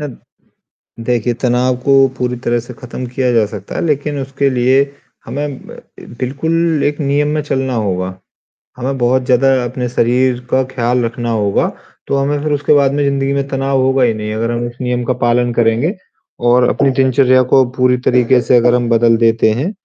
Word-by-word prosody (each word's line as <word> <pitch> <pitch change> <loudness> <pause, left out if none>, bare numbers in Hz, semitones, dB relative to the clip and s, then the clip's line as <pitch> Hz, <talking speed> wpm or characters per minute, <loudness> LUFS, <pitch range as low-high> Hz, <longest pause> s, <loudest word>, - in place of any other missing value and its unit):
अद 145 -5 -7 0.9
देखिए, 120 -1 0
तनाव 125 +1 0
को 135 -1 +5
पूरी 125 -1 -2
तरह 120 0 0
से 120 +2 -10
ख़त्म 125 +1 -8
किया 125 +1 -1
जा 115 -2 +3
सकता 100 -2 -8
है, - - -2
लेकिन 145 -1 -1
उसके 135 +1 -1
लिए 130 +1 +2 0.4
हमें 140 0 -5
ब - - -11 0.2
ए - - -12
बिल्कुल 160 +4 0
एक 145 +1 -1
नियम 145 0 0
में 155 - 0
चलना 135 -2 -2
होगा, 95 -4 -2 0.6
हमें 135 +2 -3
बहुत 125 +1 +1
ज़्यादा 135 +1 +3
अपने 125 +1 -3
शरीर 125 +1 +1
का 130 - +3
ख़्याल 125 0 0
रखना 120 +1 -4
होगा 105 -3 +1 0.4
तो - - 0
हमें 140 +1 -1
फिर 155 - -1
उसके 145 +1 +1
बाद 140 -2 +3
में 145 0 0
ज़िंदगी 140 0 0
में 140 0 -2
तनाव 135 -1 -1
होगा 130 0 +2
ही 120 -2 +2
नहीं 105 0 -5
अगर 115 +2 -2
हम 120 0 -2
उस 120 0 -11
नियम 125 -1 -1
का 130 - 0
पालन 120 0 +2
करेंगे 120 - +1 0.5
और 125 0 +4
अपनी 140 - +1
दिनचर्या 130 0 +4
को 135 - +6
पूरी 125 0 +3
तरीक़े 125 0 +3
से 125 - +3
अगर 120 +1 +3
हम 120 -1 0
बदल 115 0 +3
देते 115 -1 +2
हैं 140 - -2
125 Hz, 195 wpm, -15 LUFS, 120-135 Hz, 0.9 s, को